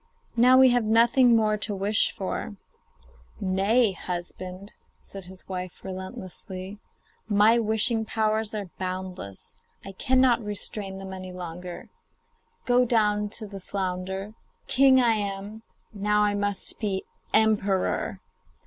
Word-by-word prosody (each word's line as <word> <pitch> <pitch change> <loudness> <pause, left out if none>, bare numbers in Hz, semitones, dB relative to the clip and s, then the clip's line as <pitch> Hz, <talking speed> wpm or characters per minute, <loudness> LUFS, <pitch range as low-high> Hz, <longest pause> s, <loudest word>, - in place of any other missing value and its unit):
Now 250 +2 +6
we 260 0 +8
have 245 -1 +2
nothing 235 +3 +5
more 215 -1 +2
to 205 0 -1
wish 200 +2 +2
for.' 195 +2 -4 0.8
'Nay, 200 +4 +3
husband,' 185 +2 -6 0.3
said 195 -2 -9
his 185 +1 -12
wife 185 -2 -6
restlessly, 190 +1 -7 0.5
'my 215 +3 +5
wishing 220 +1 +1
powers 220 0 0
are 200 -4 -5
boundless; 185 - -5 0.3
I 195 - -6
cannot 255 +3 +3
restrain 205 -1 -2
them 190 0 -7
any 185 -1 -7
longer. 180 0 -8 0.8
Go 245 0 +4
down 210 -3 +2
to 220 +1 -5
the 200 -1 -8
flounder; 190 +1 -4 0.3
king 265 0 +5
I 235 -2 +4
am, 200 +1 -4 0.3
now 210 +1 +2
I 205 0 +2
must 205 -1 -3
be 195 -3 -1 0.3
emperor. 210 -3 +1
205 Hz, 120 wpm, -26 LUFS, 190-220 Hz, 0.8 s, we